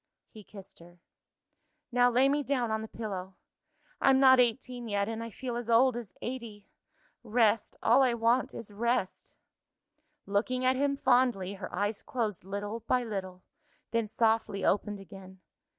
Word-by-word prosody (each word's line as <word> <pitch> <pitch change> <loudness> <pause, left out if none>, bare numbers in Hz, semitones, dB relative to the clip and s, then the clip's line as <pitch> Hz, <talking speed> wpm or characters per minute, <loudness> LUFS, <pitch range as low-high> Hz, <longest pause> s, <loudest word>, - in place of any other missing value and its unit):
He 215 - -12
kissed 195 -1 -10
her. 175 +1 -16 0.9
"Now 245 0 +4
lay 250 +3 +4
me 290 +1 +1
down 260 -5 -1
on 220 0 -1
the 220 - -6
pillow. 195 -5 -6 0.7
I'm 270 -1 +5
not 260 -1 +7
eighteen 245 0 0
yet 200 -1 0
and 225 0 -4
I 230 - -6
feel 245 +2 -5
as 240 -1 -5
old 245 +2 +5
as 235 -5 -7
eighty! 235 -5 -6 0.6
Rest; 225 -1 +1
all - - +5
I 250 -3 +3
want 235 +2 +2
is 215 - -8
rest." 220 -2 -2 0.9
Looking 235 +6 -1
at 260 +1 +4
him 280 +1 0
fondly, 245 -8 +2
her 190 -2 -8
eyes 205 +1 -2
closed 220 -8 -3
little 205 +3 -4
by 250 +2 0
little 190 -5 -6 0.5
then 230 -2 0
softly 220 -3 0
opened 205 0 0
again. 190 -1 -12
225 Hz, 155 wpm, -30 LUFS, 200-250 Hz, 0.9 s, not